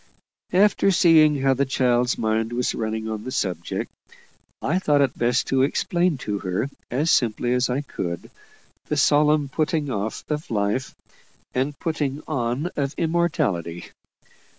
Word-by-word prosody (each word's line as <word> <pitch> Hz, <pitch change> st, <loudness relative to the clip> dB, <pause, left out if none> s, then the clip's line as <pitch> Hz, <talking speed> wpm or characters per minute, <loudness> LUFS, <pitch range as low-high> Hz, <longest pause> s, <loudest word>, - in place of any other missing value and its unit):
And 195 Hz, 0 st, +4 dB
seeing 155 Hz, -4 st, +5 dB
how 135 Hz, -1 st, +4 dB
the 135 Hz, +2 st, +1 dB
child's 125 Hz, -2 st, +1 dB
mind 110 Hz, +1 st, 0 dB
was 125 Hz, +1 st, 0 dB
running 110 Hz, 0 st, -3 dB
on 110 Hz, -1 st, -4 dB
the 130 Hz, -, -6 dB
subject, 90 Hz, -, -3 dB, 0.7 s
I 170 Hz, +6 st, 0 dB
thought 150 Hz, -6 st, +2 dB
it 135 Hz, -3 st, +1 dB
best 120 Hz, +1 st, +1 dB
to 135 Hz, -1 st, +2 dB
explain 170 Hz, +4 st, +1 dB
to 100 Hz, -1 st, -2 dB
her 95 Hz, +9 st, -2 dB, 0.2 s
as 150 Hz, +7 st, +1 dB
simply 120 Hz, +1 st, +2 dB
as 125 Hz, 0 st, +1 dB
I 125 Hz, +3 st, 0 dB
could, 85 Hz, -, -5 dB, 0.6 s
the 150 Hz, -, -1 dB
solemn 150 Hz, +1 st, +3 dB
putting 155 Hz, 0 st, -1 dB
off 110 Hz, -1 st, -3 dB
of 150 Hz, +1 st, -3 dB
life 105 Hz, +4 st, -1 dB, 0.6 s
and 135 Hz, +2 st, -1 dB
putting 150 Hz, -3 st, -2 dB
on 135 Hz, +3 st, -1 dB
of 140 Hz, 0 st, -2 dB
immortality. 155 Hz, -, -1 dB
135 Hz, 145 wpm, -23 LUFS, 115-150 Hz, 0.7 s, seeing